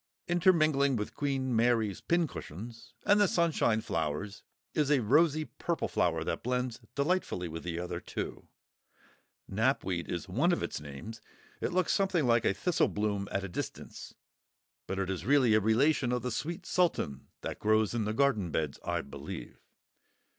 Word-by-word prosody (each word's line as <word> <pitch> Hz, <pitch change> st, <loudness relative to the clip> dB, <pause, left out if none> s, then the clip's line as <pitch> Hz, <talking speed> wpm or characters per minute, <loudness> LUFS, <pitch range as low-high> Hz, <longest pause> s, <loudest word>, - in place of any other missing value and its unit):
Intermingling 155 Hz, -6 st, +3 dB
with 105 Hz, -2 st, -3 dB
Queen 135 Hz, -3 st, -1 dB
Mary's 115 Hz, -4 st, +2 dB
Pincushions 120 Hz, -, -3 dB
and 205 Hz, 0 st, +5 dB
the 205 Hz, -, +5 dB
Sunshine 160 Hz, -11 st, +2 dB
flowers 80 Hz, +3 st, -3 dB, 0.3 s
is 150 Hz, -2 st, +1 dB
a 145 Hz, -2 st, +4 dB
rosy 155 Hz, +6 st, +3 dB
purple 170 Hz, +2 st, -2 dB
flower -, -, +1 dB
that -, -, -2 dB
blends 125 Hz, -1 st, -1 dB, 0.2 s
delightfully 140 Hz, -, 0 dB
with 80 Hz, 0 st, -6 dB
the 85 Hz, -1 st, -4 dB
other 90 Hz, 0 st, -4 dB
two; -, -, -6 dB, 1.0 s
Knapweed 95 Hz, -5 st, 0 dB
is 85 Hz, +2 st, -3 dB
one 135 Hz, -, +2 dB
of 175 Hz, -, 0 dB
its -, -, -4 dB
names; 75 Hz, +11 st, -8 dB, 0.4 s
it -, -, -1 dB
looks 185 Hz, 0 st, +2 dB
something 190 Hz, -6 st, +2 dB
like 115 Hz, -1 st, +3 dB
a -, -, +3 dB
thistle 180 Hz, -, +2 dB
bloom 100 Hz, -1 st, -1 dB
at 100 Hz, -, -1 dB
a -, -, -3 dB
distance, 90 Hz, -, -6 dB, 0.7 s
but 95 Hz, -, -3 dB
it 95 Hz, -1 st, -1 dB
is 90 Hz, -2 st, -4 dB
really 130 Hz, -1 st, +4 dB
a 110 Hz, -, +6 dB
relation 120 Hz, +5 st, +3 dB
of 125 Hz, 0 st, -1 dB
the 125 Hz, -, -2 dB
Sweet 160 Hz, +9 st, -4 dB
Sultan 165 Hz, -, 0 dB
that -, -, -5 dB
grows 110 Hz, +1 st, +2 dB
in 115 Hz, -3 st, 0 dB
the 105 Hz, -, -1 dB
garden 130 Hz, -10 st, +2 dB
beds, 75 Hz, -3 st, -2 dB
I -, -, -1 dB
believe. 70 Hz, 0 st, -8 dB
120 Hz, 160 wpm, -31 LUFS, 100-150 Hz, 1.0 s, a